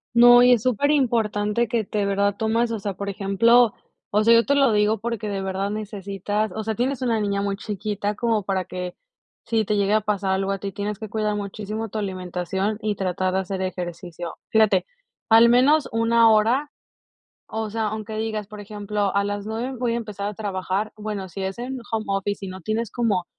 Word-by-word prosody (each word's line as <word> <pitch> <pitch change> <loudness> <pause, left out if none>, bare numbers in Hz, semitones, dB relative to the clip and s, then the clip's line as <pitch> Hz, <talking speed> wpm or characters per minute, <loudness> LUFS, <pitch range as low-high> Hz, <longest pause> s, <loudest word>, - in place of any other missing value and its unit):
No, 245 +1 +8
y 250 0 +7
es 230 -3 +1
superimportante 235 -4 +1
que 230 0 0
te 205 0 -2
verdad 200 0 +1
tomas, 230 +1 +1
o 225 - -2
sea, 200 -1 -3
por 200 0 -4
ejemplo, 215 +4 +4 0.4
o 210 +1 +2
sea, 230 +1 +6
yo 230 0 +5
te 280 - +2
lo 275 -4 +4
digo 210 0 +2
porque 230 -2 -3
de 195 -1 -2
verdad 190 +1 -2
necesitas, 205 0 -3
o 220 - -3
sea, 220 +1 -1
tienes 260 +4 -1
una 230 -3 +1
niña 200 -1 0
muy 200 0 -1
chiquita 205 0 -3
como 225 -1 +1
para 190 -1 -1
que, 180 0 -6 0.5
si 225 -1 +1
te 210 0 0
llegue 200 +1 +2
a 215 - +4
pasar 200 -2 -1
algo 195 +1 0
a 195 - -1
ti, 200 -1 -4
tienes 205 0 -3
que 220 - -6
cuidar 215 -1 -1
muchísimo 210 +2 -4
tu 215 - -5
alimentación 190 +2 -3
y 210 -1 -1
tratar 185 0 -1
de 190 - +2
hacer 190 0 -3
ejercicio. 175 -2 -5
Fíjate, 215 -4 +3 0.4
al 225 +1 +8
menos 280 +5 +4
1 230 0 +4
hora, 240 +7 +3 0.8
o 220 -1 -3
sea, 220 0 -1
aunque 215 0 -5
digas, 215 -2 -3
por 210 -1 -10
ejemplo: 205 -1 -3
"A 200 - +3
las 205 0 -3
9 240 +4 -4
voy 235 -1 0
a - - 0
empezar 205 -3 -4
a 210 - -4
trabajar", 200 0 -2
bueno, 210 -3 -5
si 195 - -7
es 190 +2 -3
en 260 +2 -4
home 220 -1 -1
office 195 0 -2
y - - -6
no 185 0 -8
tienes 220 +3 -2
como 210 -7 0
210 Hz, 205 wpm, -23 LUFS, 195-225 Hz, 0.8 s, No